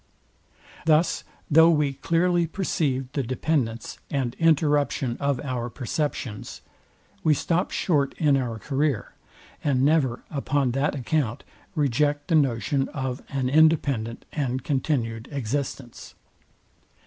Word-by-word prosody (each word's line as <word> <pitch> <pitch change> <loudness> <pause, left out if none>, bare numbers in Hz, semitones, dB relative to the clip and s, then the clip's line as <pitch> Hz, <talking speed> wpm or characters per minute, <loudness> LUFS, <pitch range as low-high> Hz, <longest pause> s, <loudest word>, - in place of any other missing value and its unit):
Thus 160 +2 +3 0.3
though 160 +2 +7
we 150 -4 +2
clearly 170 +4 +1
perceive 140 -8 -1
the 140 - -1
dependence 125 -2 -2
and 130 -4 -1
interruption 145 -5 +2
of 140 -2 0
our 125 -4 -3
perceptions, 125 -3 -4 0.6
we 155 -2 +4
stop 175 +6 0
short 145 -6 0
in 150 -3 +3
our 125 -4 -1
career, 135 +2 -1 0.5
and 135 -3 +2
never 140 -5 +2
upon 140 -2 0
that 135 +4 0
account 130 -3 -1 0.3
reject 145 +1 +1
the - - +1
notion 135 -1 +1
of 130 -2 -4
an 135 -2 -1
independent 140 -6 +2
and 130 -3 -2
continued 125 -6 -1
existence. 135 -1 -4
140 Hz, 115 wpm, -25 LUFS, 125-150 Hz, 0.6 s, though